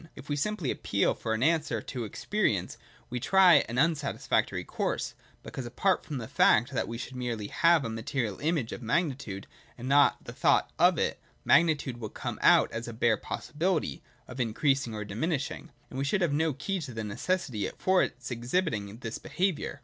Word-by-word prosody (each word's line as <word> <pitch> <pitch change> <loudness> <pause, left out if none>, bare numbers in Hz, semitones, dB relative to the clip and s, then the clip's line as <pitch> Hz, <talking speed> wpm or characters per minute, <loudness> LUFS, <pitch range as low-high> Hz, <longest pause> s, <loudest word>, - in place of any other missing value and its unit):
If 145 +1 -12
we 145 - 0
simply 175 -1 -1
appeal 100 -1 +1
for 110 -1 -2
an 110 - -1
answer 155 -6 +2
to 120 +2 -5
experience, 105 - -1 0.4
we 125 - -2
try 180 +1 +6
an 120 - -4
unsatisfactory 150 0 +1
course; - - -2 0.3
because 130 -3 -6
apart 185 +11 +1
from 150 - -5
the 115 -3 -5
fact 120 +5 +4
that 130 - -1
we 115 - -5
should 125 +2 -7
merely 120 -5 -3
have 165 -4 +4
a - - -2
material 115 -1 -3
image 150 -6 0
of - - -6
magnitude, 125 - -1 0.3
and 125 - -6
not 140 +1 +4
the - - -8
thought - - +2
of - - +5
it, - - -1 0.2
magnitude 150 -7 +3
would 110 -3 -7
come - - -4
out - - +5
as 115 +1 -5
a 120 - -6
bare 110 0 +3
possibility 165 +1 -2 0.3
(of 125 - -9
increas 135 +4 +1
ing 110 - -6
or 105 -1 -4
diminishing) 135 - -3 0.2
and 130 - -5
we - - 0
should 190 +7 +1
have 170 -5 +2
no 160 +2 +2
key 190 +8 -3
to 130 -6 -7
the 110 - -3
neces 170 - -2
sity 105 -3 -2
for 185 0 +3
its 125 +1 -3
exhibiting 120 - -1
this 115 -2 -5
behaviour. 180 -6 -2
130 Hz, 190 wpm, -29 LUFS, 115-160 Hz, 0.4 s, try